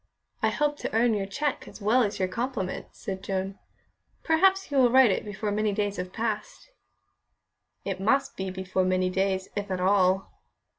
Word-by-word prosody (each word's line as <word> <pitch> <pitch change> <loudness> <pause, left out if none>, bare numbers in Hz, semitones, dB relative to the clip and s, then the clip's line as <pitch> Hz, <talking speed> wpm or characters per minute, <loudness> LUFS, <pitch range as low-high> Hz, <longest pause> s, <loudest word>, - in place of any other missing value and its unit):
"I - - +3
hope 295 0 0
to - - -4
earn 230 0 +4
your 200 -2 -1
cheque 285 +7 -2
as - - -11
well 220 +5 +3
as 210 -3 0
your 185 - 0
compliment," 230 -3 -3
said 190 -1 -6
Joan. 195 0 -3 0.6
"Perhaps 380 +2 +3
you 280 - +3
will 250 -2 +6
write 255 -2 +6
it - - -1
before 210 0 -4
many 210 0 0
days 205 0 -1
have 180 0 -4
passed." 225 - -4 1.1
"It 195 -2 -3
must 270 +8 +1
be 190 0 -3
before 185 0 -1
many 185 0 +1
days, 190 0 0
if 205 -1 -3
at 185 -1 -2
all." 190 0 +2
205 Hz, 180 wpm, -27 LUFS, 190-245 Hz, 1.1 s, will